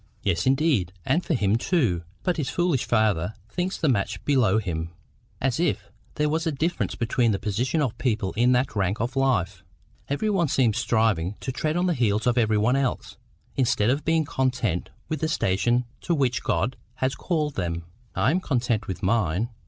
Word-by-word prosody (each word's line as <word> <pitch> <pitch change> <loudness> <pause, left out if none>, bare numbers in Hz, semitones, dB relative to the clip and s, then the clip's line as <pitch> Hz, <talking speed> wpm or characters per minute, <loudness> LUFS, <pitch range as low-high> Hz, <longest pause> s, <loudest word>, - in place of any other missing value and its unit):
"Yes, 90 0 0
indeed, 135 - +2
and 175 - +2
for 165 - 0
him 105 -2 +2
too. 120 - +1 0.2
But 180 - 0
his 150 -4 -1
foolish 175 -7 +1
father 110 -4 +1 0.2
thinks 185 +5 -2
the 160 - 0
match 100 -7 0
below 120 -8 +3
him, 85 -6 -2 0.5
as 135 +2 0
if 105 - -1 0.2
there 150 - +1
was 160 +2 0
any 155 - -1
difference 165 +5 -1
between 120 -1 +1
the - - 0
positions 120 +10 0
of 125 -5 -1
people 110 -6 0
in 120 +3 +3
that 125 0 +1
rank 100 +1 0
of 120 +4 -2
life! 100 -8 +1 0.5
Every 210 +10 0
one 180 -5 +2
seems 125 -6 +2
striving 105 -5 +1
to 130 - -3
tread 155 +5 -1
on 175 - +1
the 180 - +2
heels 110 -6 +1
of 125 0 +3
every 110 -2 +2
one 110 +5 +3
else, 135 -2 -2 0.4
instead 120 -3 +2
of 140 +3 -1
being 160 -1 +2
content 130 -11 -1 0.2
with 155 -2 -3
the 160 - +1
station 120 - +1
to 170 - 0
which 130 -5 +1
God 125 - -1 0.2
has 130 0 0
called 155 -4 -1
them. 85 -4 -3 0.3
I 130 - +3
am 175 - +2
content 120 - -1
with 95 - -5
mine. 100 0 +1
125 Hz, 190 wpm, -25 LUFS, 105-145 Hz, 0.5 s, below